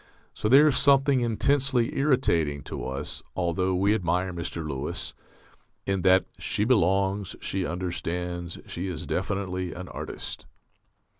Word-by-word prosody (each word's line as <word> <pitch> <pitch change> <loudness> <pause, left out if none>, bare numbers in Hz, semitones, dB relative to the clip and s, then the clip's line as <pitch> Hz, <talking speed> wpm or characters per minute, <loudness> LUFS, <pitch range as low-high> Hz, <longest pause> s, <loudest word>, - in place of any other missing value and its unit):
So 105 - -1
there 140 +5 +8
is 135 -4 +3
something 140 -2 +4
intensely 125 +1 +1
irritating 85 - +2
to - - -5
us 70 +3 -4
(although 90 +1 0
we 100 +3 +3
admire 90 -2 0
Mr. 85 -1 -4
Lewis) 70 -3 -4 0.7
in 95 -1 0
that 95 +1 +5
"_She 105 - 0
belongs, 95 -3 +2
she 95 -2 -2
understands, 90 0 -3
she 90 +3 -5
is 90 -6 -5
definitely 95 -2 -2
an 90 +1 -7
artist. - - -6
95 Hz, 130 wpm, -27 LUFS, 85-110 Hz, 0.7 s, there